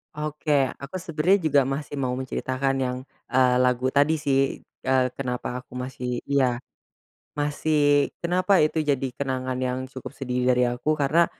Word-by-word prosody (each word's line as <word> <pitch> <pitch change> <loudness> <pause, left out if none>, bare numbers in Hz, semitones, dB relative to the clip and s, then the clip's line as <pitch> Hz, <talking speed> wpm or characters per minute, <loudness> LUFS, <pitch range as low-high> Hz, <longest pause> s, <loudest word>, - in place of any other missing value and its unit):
Oke 150 -2 0
aku 140 +6 -8
sebenarnya 175 +2 +2
juga 140 -1 +6
masih 145 +1 -4
mau 125 -1 -1
menceritakan 130 +1 -1
yang, 125 -1 -1 0.3
eee, 125 -1 +3
lagu 125 +1 +2
tadi 145 +3 +3
sih, 135 -2 +1 0.3
eee, 130 -1 +3
kenapa 125 -1 -3
aku 125 - -15
masih 125 -1 -4
iya, 130 -3 +1 0.7
masih 145 -1 +2
kenapa 185 +2 +3
itu 155 +1 +1
jadi 135 -2 0
kenangan 130 -2 -2
yang 130 0 -1
cukup 130 +1 -8
sedih 125 -2 -2
dari 125 0 +4
aku 125 +6 0
karena 155 +4 +3
135 Hz, 145 wpm, -25 LUFS, 125-150 Hz, 0.7 s, juga